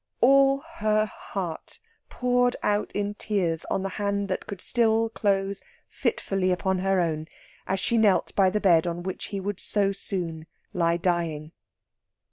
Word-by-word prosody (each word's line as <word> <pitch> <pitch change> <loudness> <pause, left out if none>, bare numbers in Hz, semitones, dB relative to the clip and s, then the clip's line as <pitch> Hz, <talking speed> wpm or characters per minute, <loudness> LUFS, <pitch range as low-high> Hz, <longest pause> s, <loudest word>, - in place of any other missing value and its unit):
All 275 +2 +5
her 215 -10 0
heart 185 -5 -6 0.3
poured 245 0 +1
out 205 0 0
in 205 0 -1
tears 185 -6 -1
on 190 - -1
the 195 - -2
hand 200 -1 -1
that 185 - -3
could 200 - -6
still 225 +1 +2
close 195 -2 0 0.3
fitfully 190 -1 -1
upon 185 +1 0
her 195 0 +1
own 160 -2 -1 0.4
as 190 - 0
she 230 +4 +1
knelt 205 -4 +3
by 195 -2 +5
the 210 +3 0
bed 175 -4 +4
on 175 0 -3
which 190 0 -5
he 200 - -4
would 195 0 -4
so 200 -2 +2
soon 170 -5 -4 0.3
lie 170 -1 +2
dying. 165 -3 -1
195 Hz, 155 wpm, -26 LUFS, 175-210 Hz, 0.4 s, All